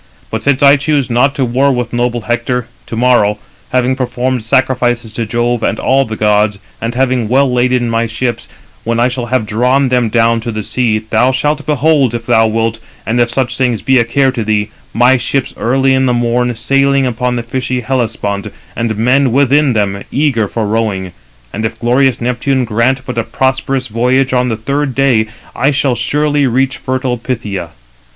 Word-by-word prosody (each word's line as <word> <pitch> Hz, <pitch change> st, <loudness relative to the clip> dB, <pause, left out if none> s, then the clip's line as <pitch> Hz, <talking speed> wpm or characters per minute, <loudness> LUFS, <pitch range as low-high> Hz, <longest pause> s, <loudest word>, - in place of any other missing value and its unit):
But 110 Hz, -, -2 dB
since 140 Hz, 0 st, +1 dB
I 140 Hz, +1 st, +7 dB
choose 145 Hz, -3 st, 0 dB
not 130 Hz, +4 st, +2 dB
to 135 Hz, -, 0 dB
war 130 Hz, +4 st, +2 dB
with 125 Hz, -2 st, -3 dB
noble 120 Hz, 0 st, -1 dB
Hector, 120 Hz, +2 st, -1 dB, 0.2 s
to -, -, -5 dB
morrow, 115 Hz, -3 st, +3 dB, 0.3 s
306 -, -, -25 dB
having 130 Hz, 0 st, +2 dB
performed 125 Hz, -1 st, -2 dB
sacrifices 120 Hz, -2 st, 0 dB
to 115 Hz, 0 st, -3 dB
Jove 120 Hz, +1 st, 0 dB
and -, -, -1 dB
all 135 Hz, +1 st, +2 dB
the 110 Hz, -, -5 dB
gods, 105 Hz, -1 st, +1 dB, 0.2 s
[and] 115 Hz, +1 st, -3 dB
having 125 Hz, -3 st, 0 dB
well 130 Hz, +1 st, +2 dB
laden 125 Hz, 0 st, +1 dB
my 115 Hz, 0 st, 0 dB
ships, 120 Hz, +2 st, -3 dB, 0.4 s
when 115 Hz, 0 st, -1 dB
I 120 Hz, -, +4 dB
shall 125 Hz, -1 st, -4 dB
have 125 Hz, -2 st, 0 dB
drawn 125 Hz, +5 st, +1 dB
them 125 Hz, -2 st, +1 dB
down 115 Hz, 0 st, +2 dB
to 115 Hz, -, -4 dB
the 110 Hz, -1 st, -4 dB
sea, 115 Hz, 0 st, 0 dB
thou 110 Hz, +4 st, +1 dB
shalt 150 Hz, +4 st, -1 dB
behold, 145 Hz, -4 st, +2 dB
if 115 Hz, 0 st, -5 dB
thou 110 Hz, -1 st, +3 dB
wilt, 115 Hz, 0 st, -1 dB, 0.3 s
and 120 Hz, +2 st, +1 dB
if 120 Hz, -, +2 dB
such 120 Hz, 0 st, -1 dB
things 125 Hz, -5 st, 0 dB
be 130 Hz, -1 st, +3 dB
a -, -, +4 dB
care 130 Hz, +3 st, +1 dB
to 120 Hz, -3 st, -3 dB
thee, 105 Hz, -1 st, -1 dB, 0.2 s
my 125 Hz, +3 st, +4 dB
ships 135 Hz, +1 st, -2 dB
early 135 Hz, +3 st, +1 dB
in 130 Hz, 0 st, +2 dB
the 125 Hz, -, +2 dB
morn 120 Hz, 0 st, 0 dB
sailing 135 Hz, +3 st, +2 dB
upon 125 Hz, 0 st, -1 dB
the 120 Hz, -, -3 dB
fishy 125 Hz, +1 st, -3 dB
Hellespont, 110 Hz, -6 st, -2 dB, 0.3 s
and 115 Hz, -2 st, -2 dB
men 125 Hz, +3 st, +2 dB
within 140 Hz, +1 st, +3 dB
them, 100 Hz, -2 st, -1 dB
eager 130 Hz, -7 st, +1 dB
for 110 Hz, +2 st, -3 dB
rowing; 105 Hz, -4 st, -1 dB, 0.4 s
and 110 Hz, -, -4 dB
if 110 Hz, -, -3 dB
glorious 125 Hz, +1 st, +2 dB
Neptune 125 Hz, +2 st, 0 dB
grant 120 Hz, +4 st, 0 dB
but 115 Hz, -, -3 dB
a -, -, 0 dB
prosperous 130 Hz, +1 st, -1 dB
voyage, 125 Hz, +4 st, +1 dB
on 125 Hz, 0 st, +1 dB
the 110 Hz, -, -2 dB
third 140 Hz, +3 st, -2 dB
day 125 Hz, -6 st, +2 dB, 0.3 s
I 135 Hz, -, +2 dB
shall 140 Hz, -2 st, +1 dB
surely 145 Hz, +4 st, 0 dB
reach 130 Hz, +1 st, 0 dB
fertile 130 Hz, -1 st, -2 dB
Phthia. 105 Hz, -8 st, -4 dB
125 Hz, 190 wpm, -13 LUFS, 115-130 Hz, 0.4 s, I